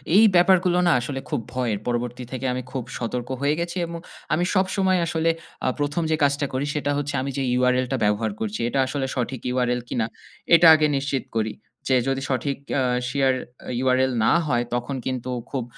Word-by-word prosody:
এই 215 - +8
ব্যাপারগুলো 180 0 +4
না - - +5
আসলে 135 +2 -4
খুব 150 -6 -1
ভয়ের। 120 -5 -1
পরবর্তী 120 +1 -2
থেকে 130 0 -4
আমি 125 - -3
খুব 130 -3 -3
সতর্ক 120 +1 -4
হয়ে 140 +1 +2
গেছি 170 +1 -3
এবং 170 0 -6 0.3
আমি 175 +3 +2
সবসময় 190 -1 +2
আসলে 165 0 0 0.4
আ - - +2
১ 145 +3 0
যে - - +4
কাজটা 140 0 +2
করি, 130 +2 -1
সেটা 145 -1 0
হচ্ছে 145 0 -2
আমি 135 +1 -3
যে - - 0 0.2
URL 125 0 +3
টা 135 - +1
ব্যবহার 105 +1 +1
করছি। 110 -1 -3
এটা 135 - -1
আসলে 135 0 -2
সঠিক 125 0 -2
URL 125 -1 +1
কিনা 115 -2 0 0.5
এটা 165 0 +7
আগে 155 -1 +3
নিশ্চিত 135 -1 -2
করি। 110 -1 0 0.3
যে 130 - +3
যদি 135 0 0
সঠিক 135 +1 -1 0.2
আ - - +2 0.3
শেয়ার 135 0 +2 0.3
আ - - -5
URL 130 0 +3
না - - +4 0.2
হয় 120 -4 +1
তখন 120 +3 -3
কিন্তু 130 -1 -3 0.2
খুব 135 -3 -2
135 Hz, 195 wpm, -24 LUFS, 125-150 Hz, 0.5 s, এই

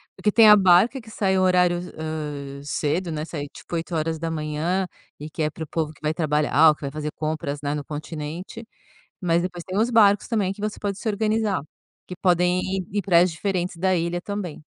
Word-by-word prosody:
porque 210 - +1
tem 225 0 +7
a 210 - +10
barca 195 +7 +4
que 220 -1 -14
sai 190 -3 +1
o - - +3
horário, 180 -1 +3 0.2
hã, 150 -3 -5
cedo, 160 +4 -1
né, 155 0 -3
sai 145 -3 -5
tipo, - - -8
8h, 165 +1 -2 0.3
e 150 +1 -7
que 155 +1 -3
é 150 - +1
para 160 +1 -7
o - - -22
povo 155 0 -2
que 155 - -20
vai 155 0 0
trabalhar 150 -1 +4
ou - - +4
que - - -15
vai 140 - -2
fazer 150 +1 -4
compras, 155 -2 -3
né, 145 0 -2
no 145 - -4
continente, 155 +8 -7 0.6
mas 170 -3 +2
depois 175 -1 -4
tem 185 +3 -4
os 225 +2 +3
barcos 210 -4 +4
também 205 -5 0
que 195 - -12
você 210 0 -4
pode 200 -1 -3
se 220 - -3
organizar, 215 -2 0 0.5
que 180 - -7
podem 180 0 +3
ir 190 -1 -3
em 205 - +1
praias 180 -2 +4
diferentes 180 +1 -2
da 185 +2 +1
ilha 170 0 -1
também. 185 -6 -6
175 Hz, 205 wpm, -24 LUFS, 155-195 Hz, 0.6 s, a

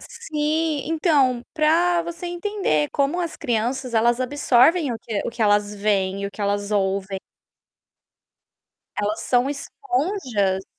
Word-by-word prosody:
Sim. 305 0 -2
Então, 290 -7 +2
para 340 +2 +3
você 340 +1 -6
entender 350 - -1
como 285 +5 0
as 335 -2 -3
crianças 245 0 -2
elas 235 +2 +3
absorvem 280 +3 +3
o 230 - -5
que 220 -2 -3
o - - -2
que 235 0 -11
elas 205 -1 +2
veem 200 -1 0
e - - -1
o - - -6
que 200 +1 -12
elas 205 0 -1
ouvem. 195 -1 0 1.8
Elas 210 +1 -1
são 245 +1 +2
esponjas. 285 - -1
250 Hz, 135 wpm, -23 LUFS, 205-320 Hz, 1.8 s, para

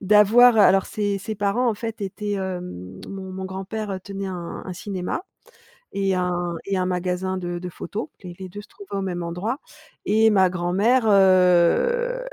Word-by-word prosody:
d'avoir 215 +4 +6
alors, 195 -2 +5
ses 205 -2 -1
ses 215 +3 -5
parents, 205 +5 +1
en 225 - +1
fait, 225 +1 -6
étaient 205 +1 -4
hem, 180 - -5
mon 190 -1 -7
mon 190 0 -5
grand-père 195 +1 -4
tenait 195 -1 -5
un 175 -2 -6
un 185 - -5
cinéma 185 - -4 0.7
et 195 -1 0
un 180 0 0 0.4
un 185 -1 +1
magasin 180 +1 -1
de 175 -1 -4
de 180 0 -6
photos 205 - -5
et 180 -2 -8
les 190 -1 -7
2 205 +3 -8
se - - -17
trouvaient 200 -1 -10
au - - -1
même 180 -2 -3
endroit. 180 +10 -3 0.5
Et 220 +2 +4
ma 190 -3 +4
grand-mère, 190 +8 +2
heu 195 - +4
195 Hz, 170 wpm, -23 LUFS, 180-210 Hz, 0.7 s, d'avoir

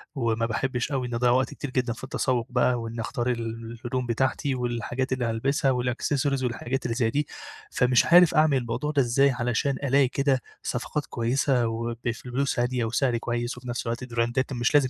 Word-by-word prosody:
وما 115 -3 0
باحبّش 125 +3 -2
أوي 130 -2 -1
إن 120 - -6
أضيّع 120 +1 +3
وقت 130 +1 +2
كتير 145 - -6
جدًا 125 -2 0
في 120 - -13
التسوُّق 130 -2 -1
بقى، 125 0 +2
وإنّي 115 0 -5
أختار 120 +2 -2
ال 115 -1 -4
الهدوم 125 +1 -1
بتاعتي 130 +3 0
والحاجات 120 +1 -2
اللي 130 -2 -1
هالبسها 130 +4 +1
والaccessories 130 +2 0
والحاجات 125 +2 -2
اللي 115 - -1
زي 115 -2 +2
دي، 145 +5 -1 0.4
فمش 125 -1 +3
عارف 175 0 +6
أعمل 155 -2 +4
الموضوع 120 +4 -2
ده 145 -2 +3
إزاي 135 +3 +3
علشان 120 +3 0
ألاقي 135 0 +4
كده 135 0 +1 0.2
صفقات 145 +4 -2
كويسة 120 +1 +1
وبفلوس 120 +3 -2
هادية 125 -1 0
وسعر 120 +1 +1
كويس 120 +1 -3
وفي 125 0 -9
نَفْس 120 -1 -3
الوقت 115 +2 -2
براندات 120 +3 0
مش 120 +2 0
لازم 140 -3 +5
125 Hz, 180 wpm, -26 LUFS, 120-135 Hz, 0.4 s, عارف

